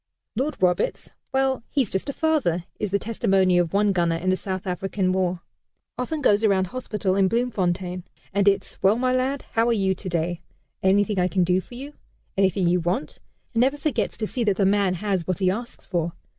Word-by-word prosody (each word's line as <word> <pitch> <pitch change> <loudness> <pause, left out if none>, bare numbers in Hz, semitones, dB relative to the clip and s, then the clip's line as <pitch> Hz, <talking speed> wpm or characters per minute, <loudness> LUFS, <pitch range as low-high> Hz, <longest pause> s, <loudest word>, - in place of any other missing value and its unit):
"Lord 270 +7 -1
Roberts! 180 -1 0 0.2
Well, 265 -1 +1
he's 265 -8 0
just 190 +8 -2
a - - -2
father," 270 - +1 0.2
is 210 - -1
the 200 - +2
testimony 195 -4 +2
of 170 -2 +1
one 205 0 +3
gunner 170 -3 +1
in 180 +3 0
the - - +3
South 190 +1 -5
African 190 +1 -1
War. 185 -2 0 0.5
"Often 270 +5 -3
goes 210 -3 +4
around 195 -3 +3
hospital 210 -3 -2
in 195 -1 +4
Bloemfontein, 185 -6 -1 0.3
and 200 0 +2
it's 195 -1 +1
'Well, 195 +3 +5
my 255 +2 +1
lad, 260 +2 0
how 225 +1 +2
are - - +3
you 195 -3 +1
today? 175 -2 -3 0.4
Anything 200 +1 +2
I 180 - +3
can 185 0 +1
do 180 +1 +2
for 240 - -13
you? 280 +4 -8 0.4
Anything 190 -1 +2
you 180 +1 +3
want?' 170 -2 -2 0.3
and 230 - +2
never 270 +3 +2
forgets 280 -8 -1
to 215 - -2
see 240 +3 -2
that 205 -3 +2
the 195 - +2
man 195 -1 +2
has 190 -2 -2
what 185 - 0
he 185 -2 +2
asks 235 +5 -6
for. 170 -2 -2
195 Hz, 200 wpm, -24 LUFS, 185-230 Hz, 0.5 s, Well